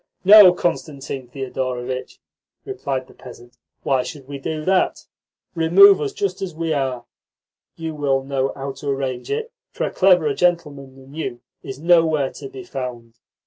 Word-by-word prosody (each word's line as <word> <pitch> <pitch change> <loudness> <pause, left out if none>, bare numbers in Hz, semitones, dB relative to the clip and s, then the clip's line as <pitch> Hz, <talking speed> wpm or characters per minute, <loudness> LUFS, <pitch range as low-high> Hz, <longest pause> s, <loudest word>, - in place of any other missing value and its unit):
"No, 205 -1 +10
Constantine 140 -7 -4
Thedorovitch," 130 0 -5 0.5
replied 140 - -4
the - - -18
peasant. 120 -1 -14 0.2
"Why 135 -2 +1
should 135 +1 -9
we 140 -1 -7
do 155 +2 -4
that? 190 0 +1 0.5
Remove 180 +3 +6
us 145 - -2
just 190 -2 -3
as 180 -4 -5
we 165 0 -2
are. 130 -4 -2 0.7
You 160 -1 -5
will 140 -3 0
know 135 0 -1
how 135 0 -5
to 135 +2 -7
arrange 135 -2 -3
it, 455 +2 -3 0.2
for - - -5
a - - -3
cleverer 180 -6 +3
gentleman 150 -6 -1
than 135 +1 -16
you 130 -6 -5 0.2
is 135 - -8
nowhere 160 -3 +2
to 405 - -9
be 395 -1 -9
found. 120 - -7
140 Hz, 155 wpm, -21 LUFS, 130-175 Hz, 0.7 s, No